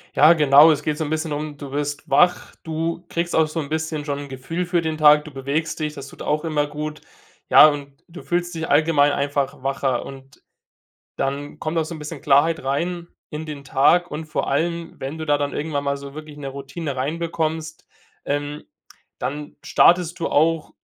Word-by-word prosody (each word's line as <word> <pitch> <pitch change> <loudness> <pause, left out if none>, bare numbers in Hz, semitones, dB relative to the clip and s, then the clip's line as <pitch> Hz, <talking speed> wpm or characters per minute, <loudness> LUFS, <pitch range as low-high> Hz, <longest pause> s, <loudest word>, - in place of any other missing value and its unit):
Ja, 155 +3 +7
genau, 150 0 +7
es 150 0 -5
geht 150 0 -1
so 160 - -2
'n - - -5
bisschen 155 0 -2
um 150 0 -4
du 140 -2 -8
wirst 145 +1 -3
wach, 175 +6 +3
du 165 +2 -3
kriegst 170 0 -2
auch 160 -1 +4
so 160 +1 -3
'n 140 - -7
bisschen 155 -1 -2
schon 145 -1 -3
'n 145 - -7
Gefühl 150 +7 -4
für 175 -1 +1
den 160 -1 -2
Tag, 150 -1 +6
du 155 - -11
bewegst 140 +5 -3
dich, 150 -1 -2
das 140 -2 -9
tut - - -13
auch 150 0 -1
immer 150 -3 0
gut, 150 +1 -5 0.5
ja, - - +9
und 140 -1 -6
du 175 +2 -10
fühlst 175 0 -2
dich 160 -1 -4
allgemein 145 -1 +4
einfach 140 -2 -2
wacher 135 -2 -1
und 135 -1 -12 0.8
dann 140 +2 -3
kommt 155 +1 -3
auch 165 - +2
so 165 - -7
'n - - -8
bisschen 150 -1 -7
Klarheit 145 +2 +3
rein 170 +6 -2 0.2
in 150 0 -6
den 150 -3 -7
Tag 175 +6 +3
und 155 +2 -5
vor 155 0 -3
allem, 170 +4 -1
wenn 140 +4 -5
du 160 - -5
da 145 -1 +3
dann 145 0 -2
irgendwann 145 -2 -2
mal 140 0 -1
so 140 0 -10
wirklich 155 -1 -10
'ne 140 -2 -5
Routine 140 +2 -6
rein 140 +6 -2
bekommst, 160 -1 -3 0.4
ähm, 145 +1 -3 0.5
dann 145 +4 -5
startest 175 0 +3
du 165 - -1
auch, 160 +1 +1
150 Hz, 205 wpm, -22 LUFS, 140-160 Hz, 0.8 s, ja